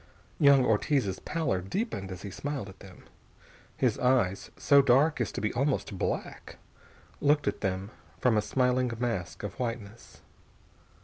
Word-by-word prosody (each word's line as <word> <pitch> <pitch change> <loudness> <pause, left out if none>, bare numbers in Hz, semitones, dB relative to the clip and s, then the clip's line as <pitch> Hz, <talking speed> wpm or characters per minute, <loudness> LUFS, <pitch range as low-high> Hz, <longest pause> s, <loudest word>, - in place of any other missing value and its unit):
Young 140 -3 +6
Ortiz's 110 -2 +1
pallor 155 - -1
deepened 100 - -3
as 90 - -8
he 100 - -6
smiled 140 -3 -4
at 95 - -14
them. 95 -2 -14 0.7
His - - +1
eyes, 125 -7 +1
so 140 -1 +5
dark 135 +2 +3
as 120 - -1
to - - -4
be 110 - -1
almost 130 -5 -1
black, - - -4 0.6
looked 145 0 +2
at - - -1
them 95 +1 -2 0.3
from 125 -3 +2
a 105 - +3
smiling 125 +2 +1
mask 115 -9 -3
of 105 - -6
whiteness. 115 -3 -6
120 Hz, 145 wpm, -29 LUFS, 100-140 Hz, 0.7 s, Young